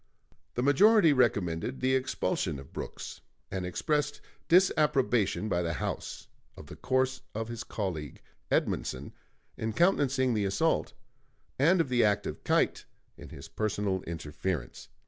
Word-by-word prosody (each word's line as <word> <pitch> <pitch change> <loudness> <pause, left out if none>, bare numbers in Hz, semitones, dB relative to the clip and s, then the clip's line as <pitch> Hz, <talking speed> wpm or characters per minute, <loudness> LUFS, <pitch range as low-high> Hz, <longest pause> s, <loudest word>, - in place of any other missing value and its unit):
The 120 - 0
majority 170 +4 +6
recommended 105 -3 +1
the 130 +1 +1
expulsion 100 - -1
of 70 0 -12
Brooks, - - -7 0.3
and 95 -2 -3
expressed 145 - -1 0.3
disapprobation 150 - +3
by 90 -4 0
the 85 -1 -1
House 75 - -4 0.3
of - - -10
the - - -10
course 130 0 0
of 115 +1 -3
his 120 0 -5
colleague, 85 - -4 0.3
Edmundson, 65 +3 -1 0.5
in 110 0 -2
countenancing 135 - +2
the 105 -2 0
assault, 95 0 +1 0.7
and 170 +7 +5
of 165 - +1
the 125 -2 +3
act 105 -1 +2
of - - -6
Keitt - - +1 0.3
in - - -11
his 70 - -10
personal 100 -3 -1
interference. 75 -3 -4
115 Hz, 135 wpm, -29 LUFS, 90-135 Hz, 0.7 s, majority